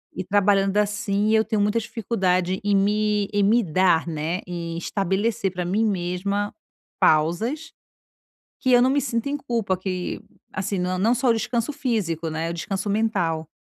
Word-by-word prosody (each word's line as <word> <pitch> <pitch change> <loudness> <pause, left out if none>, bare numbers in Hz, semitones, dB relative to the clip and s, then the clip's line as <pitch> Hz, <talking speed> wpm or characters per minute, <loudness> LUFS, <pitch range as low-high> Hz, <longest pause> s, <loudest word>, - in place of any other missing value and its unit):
E 185 - -3
trabalhando 200 0 +2
assim, 210 0 +1
eu 220 - +4
tenho 215 -2 0
muita 210 +3 +2
dificuldade, 190 -5 -1
em 205 0 +2
me 210 +1 +2
em 205 -1 +2
me 230 +4 +4
dar, 175 -1 +2
né, 160 +3 -2
em 170 -1 -5
estabelecer, 195 +3 -1
para 180 -1 -4
mim 205 +5 +1
mesma, 200 +1 -1 0.5
pausas, 220 - +1 0.9
que 260 - +1
eu 245 0 +6
não 255 - +4
me 285 +1 +2
sinto 235 +1 -2
em 290 - -1
culpa, 230 -9 -1
que, 185 -1 -4 0.3
assim, 190 0 -2
não 180 +1 -1
não 220 +6 +3
só 250 +1 +1
o - - +5
descanso 235 +4 -1
físico, 200 - -2
né, 160 +1 -3
o - - -3
descanso 195 +4 -3
mental. 185 -7 0
200 Hz, 165 wpm, -23 LUFS, 180-225 Hz, 0.9 s, eu